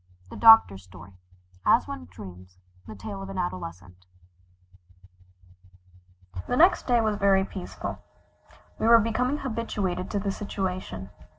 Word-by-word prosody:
IV 90 - -26
THE - - -8
DOCTOR'S 225 - +7
STORY 95 0 -14 0.5
AS - - +3
ONE 85 -1 -7
DREAMS 90 0 -12 0.3
THE 110 - -9
TALE 100 0 -7
OF 95 - -8
AN 95 - -7
ADOLESCENT 90 +1 -6 2.4
The 245 - -1
next 350 +4 +4
day 240 -2 +3
was 215 -2 0
very 195 -1 +3
peaceful. 190 -2 -7 0.8
We - - 0
were 230 0 +8
becoming 240 +5 0
habituated 210 -8 -3
to 205 - -2
the 200 0 -2
situation. 185 - -5
185 Hz, 130 wpm, -26 LUFS, -, 2.4 s, were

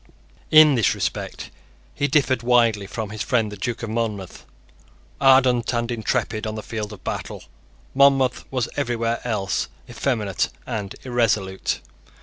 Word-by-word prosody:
In 155 -1 +8
this 115 -7 +2
respect - - -4 0.4
he 145 - 0
differed 130 -4 +2
widely 115 -4 +3
from 110 0 -5
his 110 -1 -6
friend 110 +1 +1
the - - -6
Duke 115 +4 -4
of 110 - -4
Monmouth. 110 -5 -4 0.7
Ardent 130 -3 +5
and 120 0 -1
intrepid 110 -1 -1
on 110 - -4
the 110 - -6
field 110 -2 -5
of 105 - -11
battle, - - -5 0.5
Monmouth 135 -2 +4
was 130 -3 -1
everywhere 120 -4 -1
else 105 -5 -1 0.2
effeminate 105 -9 -1 0.2
and 105 -2 -4
irresolute. 110 -7 0
115 Hz, 135 wpm, -23 LUFS, 105-125 Hz, 0.7 s, In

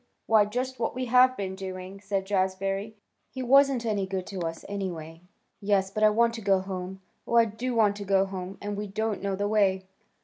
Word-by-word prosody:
Why 215 -2 +5
just 255 +4 -3
what 230 - -1
we 255 0 -2
have 255 +1 +5
been 190 -2 -3
doing," 190 0 -7
said 195 -1 -2
Jazbury. 195 +2 -1 0.3
"He 260 0 -5
wasn't 270 -1 +4
any 205 -3 0
good 190 -1 -3
to 195 - -6
us, 165 -1 -4
anyway." 170 -5 -5 0.4
"Yes, 195 -1 +1
but 215 - -3
I 215 - +8
want 230 +2 +2
to 230 - -6
go 195 -2 +3
home. 190 0 -6 0.3
Oh, 235 - -1
I 230 -1 +7
do 235 +3 -4
want 210 -3 +3
to 205 - -5
go 195 0 +3
home; 190 0 -6
and 205 0 -3
we 205 +1 -4
don't 215 +1 -2
know 200 0 -1
the 205 +1 -1
way." 195 -3 +2
200 Hz, 210 wpm, -27 LUFS, 190-225 Hz, 0.4 s, I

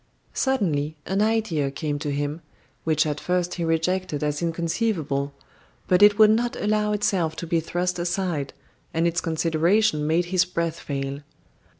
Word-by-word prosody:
Suddenly 160 - 0
an 195 +2 0
idea 210 -10 +1
came 145 +1 -3
to 145 -1 -3
him, 145 +3 -2 0.4
which 155 -1 +2
at 150 -1 -2
first 180 -1 -1
he 175 - -3
rejected 165 -1 0
as 150 +1 -1
inconceivable; 165 -4 -1 0.6
but 180 +1 +3
it 205 0 +7
would 215 -1 +7
not 235 +2 +1
allow 210 0 0
itself 195 -6 0
to 170 - -5
be 165 0 +1
thrust 175 +2 -2
aside, 175 -5 -1 0.4
and 165 +1 +2
its 170 +1 +1
consideration 165 +1 +1
made 165 +3 +2
his 180 -1 +5
breath 170 -2 -3
fail. 140 -1 -4
170 Hz, 155 wpm, -24 LUFS, 155-190 Hz, 0.6 s, it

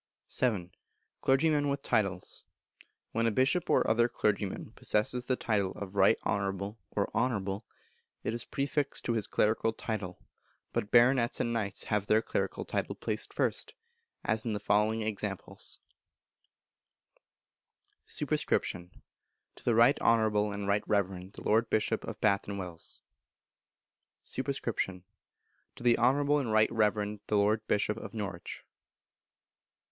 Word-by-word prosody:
vii. 100 -8 +1 0.5
Clergymen 145 +1 +3
with 140 0 -2
Titles. 95 -4 0 0.7
When 115 +1 +1
a - - +2
Bishop 135 - +1
or - - +3
other 120 +2 +3
Clergyman 105 -4 -1
possesses 120 +4 0
the 130 - +1
title 100 -6 0
of 100 -1 -8
Right 95 -1 +5
Honourable 100 +2 -2
or 100 - -1
Honourable, 100 -4 -1 0.6
it - - -1
is 120 0 0
prefixed 140 +1 -2
to 120 - +1
his 110 -3 -1
Clerical 110 +1 +1
title, 105 -6 -4 0.6
but 105 - -1
Baronets 120 +1 +4
and 120 -1 0
Knights 100 -4 -2
have 105 -1 -1
their 110 +1 +4
clerical - - -2
title - - -2
placed - - -2
first, - - -1 0.5
as 110 0 0
in 115 - -2
the 105 - -2
following 105 +2 +2
examples: 105 -2 -4 2.3
Sup. - - -5
To 90 0 -4
the 120 - +2
Right 120 +5 +5
Honourable 110 -2 +3
and 100 0 -4
Right 100 +1 +2
Reverend 95 -2 -1
the - - -10
Lord 110 +2 +2
Bishop 110 +1 +1
of - - -7
Bath 100 -2 +2
and 100 0 -4
Wells. 90 -4 -8 1.2
Sup. 130 - -5
To 110 -9 -2 0.8
the 120 -1 +5
Honourable 140 +4 +3
and 125 -6 -2
Right 110 0 +4
Reverend 105 -2 +1
the 105 - +2
Lord 105 +2 +2
Bishop 105 +1 +1
of 110 - -8
Norwich. 95 -5 -5
110 Hz, 135 wpm, -31 LUFS, 100-120 Hz, 2.3 s, Right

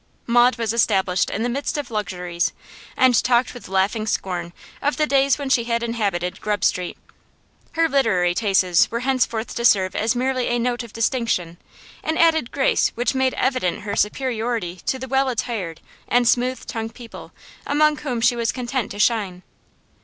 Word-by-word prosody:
Maud 240 +1 +4
was 230 -1 -1
established 190 -5 +2
in 220 - -2
the - - +1
midst 280 +5 -2
of 285 -5 -5
luxuries, 180 -5 -2 0.4
and 255 -3 +4
talked 245 0 +2
with 245 - -10
laughing 200 +3 0
scorn 175 -4 -2 0.3
of 290 - 0
the 305 - +3
days 275 -2 +3
when 285 -2 -4
she 255 -3 +2
inhabited 215 -7 -1
Grub 210 -2 -1
Street; 180 -1 0 0.8
her 330 0 +2
literary 215 - +2
tastes 190 -4 +3
were 235 +1 -3
henceforth 250 -3 0
to 235 - -4
serve 190 -5 +3
as 220 +2 +1
merely 255 0 0
a 240 - +1
note 240 +1 -1
of 235 -3 -10
distinction, 225 -8 -1 0.5
an 315 +1 -1
added 320 -6 +3
grace 270 -2 +2
which 240 +3 0
made 260 -1 +1
evident 255 -9 0
her 200 0 -4
superiority 225 -5 -1
to 265 - +1
the 260 0 -7
well 265 +1 +1
attired 215 -9 -3 0.3
and 245 0 +3
smooth 250 +2 +1
tongued 225 0 -5
people 235 -2 -11 0.4
among 300 +1 +3
whom 250 -6 -3
she 240 +1 +4
was 230 -1 0
content 250 -2 -3
to 205 - -8
shine. 205 -5 0
235 Hz, 170 wpm, -22 LUFS, 200-255 Hz, 0.8 s, Maud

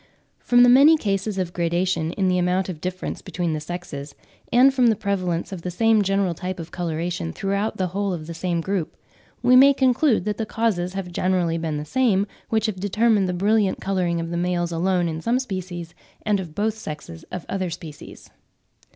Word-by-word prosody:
From 245 0 +4
the - - +7
many 280 +6 +7
cases 200 -4 -2
of 180 -2 -2
gradation 170 -1 0
in 190 -2 0
the 180 0 +2
amount 180 +2 0
of 160 -4 -6
difference 185 0 -4
between 175 -3 -3
the 155 - -2
sexes, 150 -4 -7 0.4
and 260 +3 +6
from 255 -2 +3
the 225 - +4
prevalence 185 -4 -2
of 185 -3 -6
the 180 - -4
same 220 +4 +3
general 195 -2 +1
type 180 +2 -5
of 165 0 -8
coloration 170 - -3
throughout 200 - -2
the 185 -1 -1
whole 200 +2 -1
of 165 -4 -4
the 170 - -6
same 170 0 -2
group, 190 -2 -2 0.5
we 250 +1 +6
may 275 +2 +7
conclude 260 - +2
that 210 -1 -2
the 225 - -2
causes 190 -6 -1
have 190 -2 -5
generally 175 -2 0
been 160 -2 -2
the 150 - -5
same 205 - +2 0.2
which 220 -1 +1
have 210 -5 -2
determined 205 0 +2
the - - -1
brilliant 200 +2 +1
colouring 180 -3 -1
of 165 0 -4
the 170 - -2
males 175 0 -1
alone 175 +1 +1
of 160 0 -4
some 235 +2 +2
species, 185 -8 -5 0.3
and 210 -2 +2
of 165 -5 -7
both 215 +1 0
sexes 150 - -8
of 180 -2 -5
other 190 -2 -2
species. 160 -2 -10
185 Hz, 200 wpm, -23 LUFS, 170-210 Hz, 0.5 s, the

